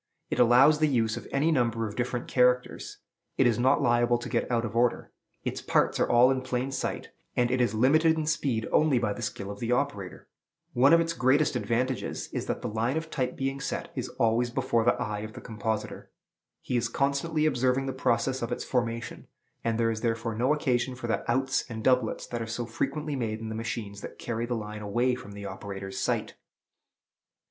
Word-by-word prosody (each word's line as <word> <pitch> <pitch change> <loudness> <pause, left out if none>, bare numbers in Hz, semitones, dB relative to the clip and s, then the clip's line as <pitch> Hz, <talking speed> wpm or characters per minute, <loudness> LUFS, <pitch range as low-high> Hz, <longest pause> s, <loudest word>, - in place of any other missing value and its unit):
It - - -1
allows 125 +5 +6
the 155 - +4
use 115 -5 +1
of - - -8
any 145 +4 +2
number 115 -5 +1
of 105 - -8
different 120 0 -2
characters, 125 0 +1 0.4
it 135 - +4
is 120 -2 +3
not 130 +3 +3
liable 120 0 +3
to 120 - -7
get - - -1
out 120 -1 +1
of 115 - -6
order, 120 0 +1 0.3
its - - -3
parts - - +1
are - - +2
all 120 +2 +6
in 130 -1 0
plain 130 +1 -2
sight, 135 - -3 0.3
and 120 0 +2
it 130 0 +2
is 120 -2 +1
limited 155 +8 +4
in 155 - -1
speed 135 -7 0
only 150 -4 +4
by 110 -4 0
the 120 - -8
skill 100 -2 -4
of 100 - -9
the 120 0 -2
operator. 120 -8 -2 0.5
One 130 +3 +5
of 165 0 +7
its 165 0 -1
greatest 140 +1 +2
advantages 125 +2 -1
is - - -4
that - - -3
the - - -1
line 115 +6 -1
of 160 0 -5
type 125 -1 -1
being 135 0 -2
set 135 - -4
is - - -4
always 115 +2 +2
before 115 -1 +1
the 120 - +3
eye 105 -1 -2
of 110 +1 -7
the - - -8
compositor. 110 -1 -4 0.5
He 125 - -3
is 120 -1 +1
constantly 140 +5 0
observing 130 -2 +2
the 135 - -3
process 130 +1 0
of 120 +1 -3
its 120 - -2
formation; 115 -2 -3 0.4
and 115 -1 0
there 115 -1 +2
is 110 -1 -4
therefore 115 -1 -1
no 120 +5 +1
occasion 130 -4 0
for 125 - -7
the 115 0 -1
"outs" 130 +2 +1
and 110 -1 -6
"doublets" 125 -4 +2
that 120 -1 -4
are 115 - -4
so 115 +2 -3
frequently 150 +6 -2
made 110 -4 -2
in 110 0 -5
the - - -4
machines 110 -3 -5
that - - -8
carry 120 0 -3
the 120 - -1
line 105 -1 -6
away 120 +5 +1
from 105 -5 -7
the 100 0 -8
operator's 95 0 -6
sight. - - -1
120 Hz, 210 wpm, -28 LUFS, 115-130 Hz, 0.5 s, of